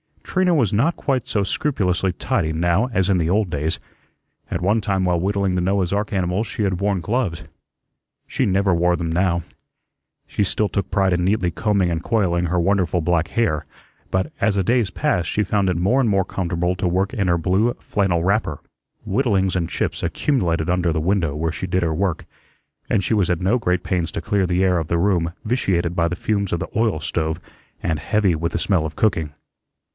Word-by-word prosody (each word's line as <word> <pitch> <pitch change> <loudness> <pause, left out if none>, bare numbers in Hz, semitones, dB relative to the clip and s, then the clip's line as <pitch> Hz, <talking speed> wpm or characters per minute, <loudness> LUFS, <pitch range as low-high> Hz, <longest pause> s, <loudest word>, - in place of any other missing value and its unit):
Trina 185 -2 +1
was 120 -10 +2
not 135 +11 +2
quite 130 -4 -1
so 105 - 0
scrupulously 95 - 0
tidy 80 -2 -1
now 85 +8 +2
as 95 -2 +1
in 95 - +3
the 80 -2 0
old 100 +1 +2
days. 75 +1 -2 0.7
At - - -2
one 105 +5 +2
time 95 -3 0
while 90 -2 +1
whittling 100 +1 0
the 90 - 0
Noah's 95 -1 +1
ark 105 +2 -1
animals 95 +3 0
she 105 +2 -3
had 95 -3 0
worn 100 -2 0
gloves. 105 -5 -1 0.8
She - - -1
never 95 0 +2
wore 90 +1 +2
them 85 -1 -3
now. 85 0 +1 0.8
She 105 - -1
still 105 +2 0
took 100 -2 -2
pride 95 -1 +2
in 90 0 +1
neatly 95 -3 +1
combing 100 -1 +1
and 80 -1 -2
coiling 90 -5 +1
her 90 +1 0
wonderful 90 -1 +1
black 85 +1 +1
hair, 90 - 0 0.4
but 95 +11 -1
as 110 -3 +2
the 95 - +1
days 115 0 +2
passed 85 0 0
she 105 - +1
found 100 -1 +1
it 90 - 0
more 100 +10 +2
and 125 -4 +2
more 95 -2 +2
comfortable 90 -1 -1
to 90 - 0
work 95 +6 0
in 100 -7 0
her 85 -1 +3
blue 95 +8 +1
flannel 95 -5 0
wrapper. 95 -6 0 0.5
Whittlings 95 -5 +1
and 85 -2 -2
chips - - -2
accumulated 85 - 0
under 90 -2 +1
the 80 - -1
window 85 -4 0
where 80 +2 -1
she 95 - -5
did 90 +1 0
her 80 -1 0
work, 90 0 -1 0.6
and 100 - +2
she 110 - 0
was 100 -5 +2
at 90 -1 0
no 100 +7 +2
great 90 -4 0
pains 85 -3 -1
to - - -3
clear 100 0 0
the 90 +1 +1
air 90 -2 +3
of 80 - -4
the 85 - 0
room 85 -2 +1
vitiated 95 -8 0
by 85 -1 +1
the 90 - -2
fumes 100 +1 -1
of 85 - -1
the - - -4
oil 110 -7 +1
stove 80 +1 -2 0.4
and 80 -2 0
heavy 100 +4 +1
with 85 +1 -2
the - - 0
smell 90 -3 +1
of 80 - -5
cooking. 80 -8 0
95 Hz, 210 wpm, -21 LUFS, 85-100 Hz, 0.8 s, in